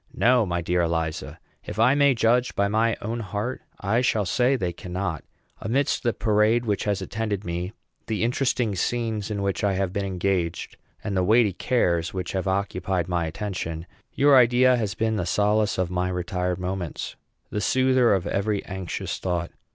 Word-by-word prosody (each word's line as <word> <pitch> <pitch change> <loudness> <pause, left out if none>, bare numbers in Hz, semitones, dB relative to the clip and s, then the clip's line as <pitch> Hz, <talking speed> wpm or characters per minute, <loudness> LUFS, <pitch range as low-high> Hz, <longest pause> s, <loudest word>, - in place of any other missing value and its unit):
No, 120 -3 +4
my 85 -1 -1
dear 90 +1 +1
Eliza. 80 -3 -2 0.3
If - - -7
I 130 - +5
may 140 -2 +4
judge 120 +2 +2
by 100 - +2
my 110 +2 +1
own 115 +3 -3
heart, 105 +4 -4 0.2
I 110 +4 +1
shall 110 -4 +1
say 125 +8 +2
they 90 -8 -2
cannot. 90 -2 -4 0.4
Amidst 130 +7 0
the 120 - +1
parade 110 +2 +2
which 105 -3 -1
has 100 -2 0
attended 105 0 -3
me, 85 +2 -3 0.4
the 110 -1 -1
interesting 125 -2 +1
scenes 110 +1 -1
in 100 -2 -2
which 100 0 -1
I 100 -1 +2
have 95 -1 -1
been 100 -1 -1
engaged, 90 -2 -2 0.3
and 100 - -3
the 95 - +2
weighty 110 +1 +4
cares 85 -5 0
which 90 -2 -3
have 95 0 -2
occupied 95 -2 -1
my 85 -2 0
attention, 85 -2 -4 0.3
your 140 0 +5
idea 125 +1 +5
has 110 -3 -2
been 110 -1 0
the 90 - -1
solace 105 +2 +2
of 90 -1 -1
my 90 0 0
retired 90 0 -2
moments, 90 -2 -4 0.4
the 105 - -2
soother 130 -1 +3
of 95 -1 -2
every 100 +1 -1
anxious 95 -2 -4
thought. 90 -2 -2
100 Hz, 175 wpm, -25 LUFS, 90-115 Hz, 0.4 s, I